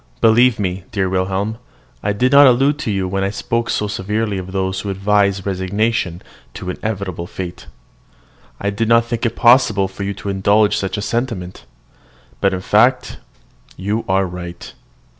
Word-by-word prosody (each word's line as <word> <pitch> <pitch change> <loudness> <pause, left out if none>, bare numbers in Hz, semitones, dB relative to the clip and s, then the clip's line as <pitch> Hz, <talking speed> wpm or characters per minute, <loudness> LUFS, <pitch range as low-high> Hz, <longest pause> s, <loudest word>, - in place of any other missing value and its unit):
Believe 115 +1 +4
me, 95 -2 -3
dear 100 -3 0
Wilhelm, 95 +4 -1 0.4
I 105 - 0
did 125 +5 +1
not 140 0 +8
allude 135 +4 +3
to 120 - -2
you 95 -2 -1
when 95 +1 -1
I 95 - 0
spoke 115 +3 -2
so 105 - 0
severely 105 +1 -2
of 95 0 -8
those 95 0 -1
who 100 - -5
advise 100 0 +1
resignation 95 -1 -1 0.3
to 90 - -4
inevitable 95 -5 -4
fate. 90 -1 -7 0.9
I 100 - -1
did 110 +2 -1
not 115 0 +5
think 115 0 -1
it 115 - -5
possible 120 -5 +4
for 95 +1 -10
you 100 0 -3
to 100 - -6
indulge 100 +2 +3
such 95 +1 -2
a 105 - -3
sentiment. 105 - -3 0.7
But 100 - +2
in 95 -1 -3
fact - - +2 0.6
you 105 +4 -2
are 95 0 +2
right. 90 -1 -8
100 Hz, 165 wpm, -18 LUFS, 95-115 Hz, 0.9 s, not